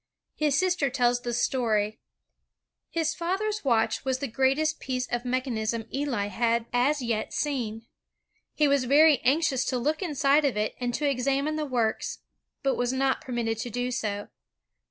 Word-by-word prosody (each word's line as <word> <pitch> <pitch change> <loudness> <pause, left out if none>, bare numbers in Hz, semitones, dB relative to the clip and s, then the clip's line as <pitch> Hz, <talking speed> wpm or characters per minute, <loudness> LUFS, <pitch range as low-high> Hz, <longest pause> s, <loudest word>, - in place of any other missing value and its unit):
His 295 -2 +1
sister 355 -5 +2
tells 245 -1 +1
this 240 0 -1
story: 215 -5 0 0.9
"His 325 -1 0
father's 390 +6 -2
watch 235 -5 +1
was 260 -1 0
the 280 - -3
greatest 270 +6 +1
piece 255 -1 -2
of 240 0 -3
mechanism 235 -3 -1
Eli 270 -7 -1
had 230 +3 0
as 265 +3 +2
yet 230 -2 -2
seen. 230 -6 -2 0.7
He 300 - +3
was 280 -2 +2
very 290 +1 +6
anxious 275 -2 +2
to 255 - 0
look 300 +8 -1
inside 290 -3 +2
of 270 -7 +1
it 215 0 0
and 245 -1 -1
to 295 - 0
examine 275 +3 0
tha^rorks, 255 -8 -1 0.5
but 270 -1 +1
was 245 0 0
not 265 0 +1
permitted 235 -3 -2
to 245 - -3
do 245 +2 -2
so. 205 -4 -3
255 Hz, 155 wpm, -27 LUFS, 235-290 Hz, 0.9 s, very